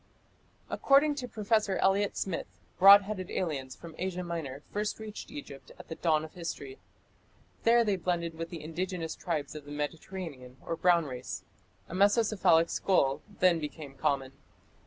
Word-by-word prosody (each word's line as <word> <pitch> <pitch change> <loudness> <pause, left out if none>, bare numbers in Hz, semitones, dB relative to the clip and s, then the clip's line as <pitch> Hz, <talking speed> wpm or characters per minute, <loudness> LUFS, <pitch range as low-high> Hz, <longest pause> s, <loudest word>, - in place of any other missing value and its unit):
According 280 +2 +4
to 250 - -5
Professor 215 -3 +1
Elliot 195 +1 +2
Smith, 190 -4 -2 0.3
broad 200 +2 +10
headed 190 -2 -5
aliens 140 -7 -3
from 170 -1 -11
Asia 180 0 -2
Minor 155 -5 -5
first 210 +1 -1
reached 220 -1 -8
Egypt 140 -1 -9
at - - -13
the - - -3
dawn 155 -2 +1
of 155 - -13
history. 180 - -6 0.9
There 235 +1 +6
they 205 -3 +1
blended 170 -1 -1
with 165 +1 -6
the 165 -3 -7
indigenous 165 +1 -3
tribes 155 -5 -3
of 150 -2 -9
the 145 - -10
Mediterranean 145 -3 -6
or 165 - -2
Brown 170 -1 +3
Race. 130 -2 -6 0.4
A - - -9
mesocephalic 200 -4 +4
skull 140 -8 +2
then 185 -4 +3
became 150 -2 -7
common. 135 -1 -1
170 Hz, 155 wpm, -30 LUFS, 150-200 Hz, 0.9 s, broad